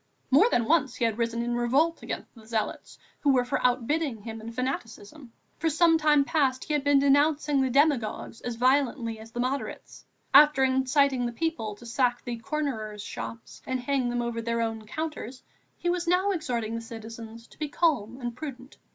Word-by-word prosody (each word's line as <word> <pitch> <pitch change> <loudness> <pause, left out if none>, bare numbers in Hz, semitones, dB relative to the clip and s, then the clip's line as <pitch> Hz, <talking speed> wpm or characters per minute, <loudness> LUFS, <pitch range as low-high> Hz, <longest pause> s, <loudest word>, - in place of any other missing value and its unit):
More 365 - +6
than 235 - +2
once 275 -3 +2
he 240 - 0
had 225 0 -1
risen 230 0 0
in 240 0 -1
revolt 265 +8 +1
against - - -6
the 220 -2 -16
zealots 220 -2 -3 0.2
who 285 - +3
were 250 -2 +3
for 245 - -2
outbidding 250 0 0
him 225 0 -7
in 230 +1 -7
fanaticism; 255 +1 -5 0.3
for 325 +1 +1
some 325 +1 +4
time 300 -2 +4
past 270 -4 +1
he 305 - -3
had 295 -2 +1
been 285 0 +4
denouncing 285 +1 +3
the 265 - +1
demagogues 260 -5 +1
as 240 -1 -4
vehemently 250 -2 +1
as 220 +1 -11
the 240 - -7
moderates. 255 +3 -4 0.3
After 295 -1 +7
inciting 265 0 +2
the - - -4
people 235 -7 -3
to 240 - -14
sack 245 +1 0
the 240 -2 -4
"cornerers'" 225 -6 -3
shops 230 +2 -8
and 260 0 -1
hang 255 -1 0
them 240 0 -1
over 235 -1 -3
their 230 0 -1
own 225 -1 -3
counters, 300 -3 -5 0.3
he - - -4
was 355 -1 -2
now 370 +3 +3
exhorting 240 - -2
the 230 - -3
citizens 225 0 -9
to - - -21
be 305 -2 -2
calm 260 -8 0
and 240 -2 -4
prudent. 265 -2 -8
255 Hz, 190 wpm, -27 LUFS, 230-290 Hz, 0.3 s, After